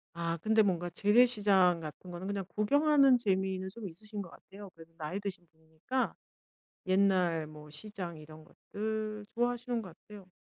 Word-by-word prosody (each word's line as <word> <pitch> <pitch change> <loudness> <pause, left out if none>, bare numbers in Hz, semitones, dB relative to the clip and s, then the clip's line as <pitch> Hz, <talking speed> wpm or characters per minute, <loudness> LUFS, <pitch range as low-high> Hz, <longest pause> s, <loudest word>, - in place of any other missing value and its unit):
아 170 0 -2
근데 220 +6 +3
뭔가 175 -4 0
재래시장 205 -5 +4
같은 160 +3 -9
거는 175 +2 -6
그냥 200 -1 -2
구경하는 275 +4 +5
재미는 190 -3 -1
좀 225 -3 -7
있으신 210 +4 -8
것 180 - -9
같아요. 200 +3 -13
그래도 165 0 -15
나이 160 +5 -4
드신 195 -4 -6
분이니까 160 +11 -3 0.7
옛날 185 -4 +2
뭐 150 0 -12
시장 175 0 -6
이런 155 +1 -13
것들 215 +4 -5
좋아하시는 240 0 0
것 185 -6 -10
같아요. 205 -2 -13
195 Hz, 340 characters per minute, -32 LUFS, 170-215 Hz, 0.7 s, 구경하는